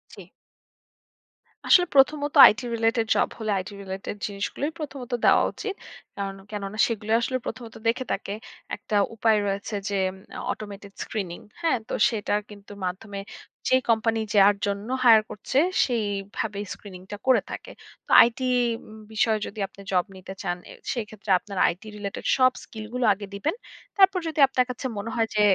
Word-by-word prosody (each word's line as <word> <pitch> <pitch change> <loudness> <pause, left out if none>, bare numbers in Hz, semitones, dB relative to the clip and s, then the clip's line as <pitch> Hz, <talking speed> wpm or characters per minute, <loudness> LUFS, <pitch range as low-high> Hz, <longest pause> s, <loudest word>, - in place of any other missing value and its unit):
জি। - - -12 1.4
আসলে 355 -1 +7
প্রথমত 285 +1 +4 0.2
IT 220 - -2 0.2
related 225 0 +1
job - - +3
হলে 215 -1 -1
IT - - -9
related 190 +1 -5
জিনিসগুলোই 205 +9 -3
প্রথমত 270 -5 -6
দেওয়া - - +6
উচিত। 415 -3 -5 0.4
কারন 195 -1 -4
কেননা 205 0 -5
সেগুলোই 220 -1 0
আসলে 255 +2 0
প্রথমত 235 -3 -7
দেখে 240 +3 +1
থাকে 200 - -3 0.4
একটা 215 0 -5 0.2
উপায় 220 -1 +3
রয়েছে 200 +2 -3
যে 200 - -1 0.2
উম - - -13 0.3
automated 200 -1 -8
screening 185 -5 -5 0.2
হ্যাঁ? 325 -6 +2
তো - - -5 0.2
সেটার 210 -2 -1
কিন্তু 205 -1 -13
মাধ্যমে 200 +2 -5 0.5
যে - - +5
কোম্পানি 225 0 +2 0.2
যার 200 +1 +7
জন্য 200 +2 -3 0.2
hire 220 -2 +8
করছে, 210 +5 -4 0.3
সেইভাবে 205 -2 -2
screening 185 -3 -11
টা 205 - -4
করে 260 - +5
থাকে। - - -7 0.4
তো - - -7 0.2
IT 235 +1 -8 0.5
উম 215 0 -12 0.2
বিষয়ে 220 0 +2
যদি 210 - -9
আপনি 195 - -15
জব 180 -2 +2
নিতে 190 0 -9
চান, 175 -2 -1
এ - - -9 0.2
সেক্ষেত্রে 215 -4 -7
আপনার 200 0 -9
IT 175 - -12
related 200 -1 -6
সব 255 0 +5
স্কিল 220 -1 -9
গুলো 250 -1 0
আগে 205 +1 -7
দিবেন। 250 - -1 0.4
তারপর 385 -1 +6
যদি 315 -1 -4
আপনার 255 -1 +1
কাছে 250 +1 -6
মনে 200 +3 -4
হয় 225 -1 +2
যে 210 - +3
215 Hz, 160 wpm, -25 LUFS, 200-245 Hz, 1.4 s, hire